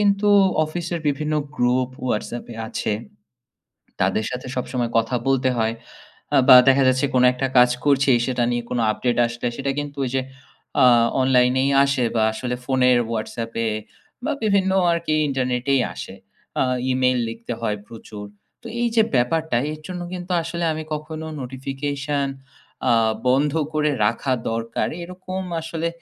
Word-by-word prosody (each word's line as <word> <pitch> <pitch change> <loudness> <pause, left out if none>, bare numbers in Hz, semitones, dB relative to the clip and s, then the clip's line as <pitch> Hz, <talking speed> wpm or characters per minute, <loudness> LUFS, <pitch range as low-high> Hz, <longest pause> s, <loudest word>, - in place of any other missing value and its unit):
কিন্তু 205 0 +2 0.4
অফিস 170 +2 -5
এর 170 - -3
বিভিন্ন 150 +2 -1 0.2
গ্রুপ 125 +1 +1
ওয়াটসঅ্যাপ 120 0 -3
এ - - -9
আছে। 110 - -2 1.1
তাদের 110 - +1
সাথে 125 0 -5
সবসময় 125 -2 -2
কথা 115 +2 0
বলতে 130 -1 +2
হয় 110 0 +1 0.6
আ - - +6
বা 130 - +10
দেখা 135 0 +5
যাচ্ছে 130 +2 +2
কোনো 125 - +5
একটা 135 +1 -1
কাজ 125 0 +7 0.2
করছি 140 -1 +4
সেটা 125 -2 0
নিয়ে 120 0 -1
কোনো 120 - -1
আপডেট 120 +2 -1
আসলে 120 +1 -4
সেটা 140 0 -2
কিন্তু 145 -1 -6
ওই - - -2
যে 130 - +2 0.6
আ - - +7 0.4
অনলাইনেই 130 +1 +3
আসে 140 -2 +1
বা 110 - +3
আসলে 125 +2 -3
ফোনের 125 -2 +3
হোয়াটসঅ্যাপে 115 0 -3 0.6
বা 300 - 0
বিভিন্ন 200 -2 +2 0.2
আর 170 - +2
কি 155 - 0
ইন্টারনেটেই 130 0 0
আসে। 95 - -8 0.5
আ - - +4 0.3
ইমেইল 130 -1 +2
লিখতে 115 +1 -6
হয় 105 -2 -1
প্রচুর। 110 -2 -9 0.4
তো 235 - -9
এই 240 - +2
যে 225 - +6
ব্যাপারটা 155 +3 +1
এর 155 - -7
জন্য 180 -1 -5
কিন্তু 180 0 -6
আসলে 170 +1 -4
আমি 155 - -5
কখনো 155 +1 -5 0.2
নোটিফিকেশন 140 +2 -3 0.6
আ - - +5 0.4
বন্ধ 140 +3 +2 0.2
করে 150 -1 +1
রাখা 115 +4 0 0.2
দরকার 115 0 -2 0.2
এরকম 185 +1 -6 0.2
আসলে 165 0 -3
130 Hz, 155 wpm, -22 LUFS, 120-150 Hz, 1.1 s, বা